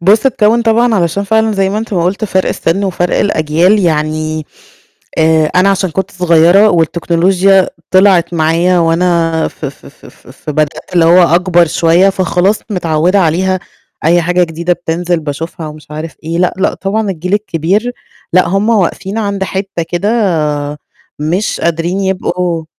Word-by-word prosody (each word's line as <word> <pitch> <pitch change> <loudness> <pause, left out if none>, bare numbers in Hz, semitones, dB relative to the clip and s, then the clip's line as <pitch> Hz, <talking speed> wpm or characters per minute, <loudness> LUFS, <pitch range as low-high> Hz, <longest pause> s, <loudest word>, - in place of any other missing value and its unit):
بُصّ 205 +8 +3
اتكوّن 235 -2 +2
طبعًا 230 +1 +2
علشان 185 +2 0
فعلًا 220 +1 +1
زي 195 -1 0
ما 210 - -2
أنت 220 -1 -6
ما 170 - 0
قُلت 195 +5 -1
فَرق 190 -2 0
السِن 195 +5 -1
وفَرق 180 -2 -1
الأجيال 175 +2 +2
يعني، 155 -2 -1 0.7
آآ 160 -1 +3
أنا 180 +4 +2
عشان 190 -2 -1
كنت 190 +3 -3
صغيّرة 180 +3 +4
والتكنولوجيا 180 +3 +2 0.2
طلعت 185 -3 +3
معايا 170 +3 +2
وأنا 165 -1 +1
ف - - -12
ف - - -8
ف - - -16
ف - - -19
فبدأت 155 +2 -4
اللي 170 - +4
هو 175 +2 +5
أكبر 175 0 +3
شوية 170 +4 +3
فخلاص 190 +2 0
متعوّدة 175 0 +1
عليها، 185 +3 0 0.4
أي 170 +2 +3
حاجة 180 +1 +1
جديدة 170 +2 -2
بتنزل 175 0 -2
باشوفها 160 +2 -6
ومش 150 -1 -13
عارف 155 +2 -7
إيه، 165 +2 -3
لأ، 180 -1 +1
لأ 190 +1 0
طبعًا 205 +2 -2
الجيل 180 +2 -3
الكبير، 205 +3 -1 0.4
لأ 185 +1 +3
هُم 195 +4 0
واقفين 200 0 -1
عند 200 -3 -2
حتّة 190 -2 -4
كده 180 +4 -2
آآ، 150 -10 -1 0.4
مش 170 +7 -2
قادرين 170 +3 -1
يبقوا 180 -3 -2
180 Hz, 155 wpm, -12 LUFS, 165-195 Hz, 0.7 s, هو